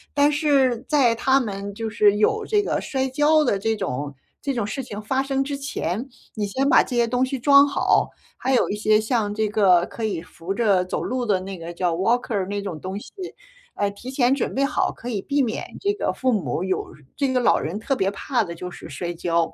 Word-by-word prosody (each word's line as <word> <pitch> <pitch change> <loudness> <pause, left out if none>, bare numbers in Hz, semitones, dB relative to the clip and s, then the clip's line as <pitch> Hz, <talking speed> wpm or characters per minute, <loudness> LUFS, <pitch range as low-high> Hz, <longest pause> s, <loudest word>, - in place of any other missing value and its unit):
但 285 +1 +4
是 275 -5 +2
在 270 -6 +4
他 265 +4 +3
们 200 -4 -4
就 225 +1 -4
是 210 -1 +4
有 425 - +2
这 415 0 +1
个 - - -1
摔 265 -1 -1
跤 295 +3 +3
的 205 -7 +1
这 225 +2 0
种 145 -8 -4 0.3
这 280 - -2
种 235 -6 -1
事 270 +6 -4
情 210 -4 -7
发 265 +5 0
生 270 0 0
之 285 0 -4
前， 265 - -3 0.2
你 210 -2 -2
先 265 +7 0
把 - - +6
这 250 - -4
些 235 -1 +3
东 245 +2 +1
西 265 +1 -1
装 280 +2 +6
好， 280 - +2 0.3
还 260 +1 0
有 - - +3
一 - - -1
些 215 0 +3
像 220 -2 0
这 220 0 +1
个 185 -5 +4
可 230 - -8
以 200 -6 -2
扶 180 +2 -6
着 200 -5 +3
走 185 - -3
路 255 0 -2
的 205 -5 +1
那 195 +1 -6
个 165 +1 -7
叫 175 -1 -1
walker 205 0 0
那 200 0 -3
种 175 -6 -5
东 190 +2 -5
西。 - - -13 0.6
哎， 205 - 0
提 245 +6 -9
前 260 0 +3
准 - - -2
备 275 +1 +2
好， 300 - 0
可 240 - -11
以 215 -5 -2
避 285 +6 0
免 235 -4 -2
这 405 +1 +1
个 - - -1
父 255 -1 0
母 175 - -1
有 190 - -2 0.2
这 275 -2 0
个 255 - +2
老 245 - +4
人 185 +7 -3
特 270 +5 -1
别 195 -4 0
怕 235 +3 -1
的 170 - -6
就 180 +2 -7
是 - - -11
摔 175 -1 -4
跤。 170 -1 0
225 Hz, 265 characters per minute, -23 LUFS, 195-270 Hz, 0.6 s, 把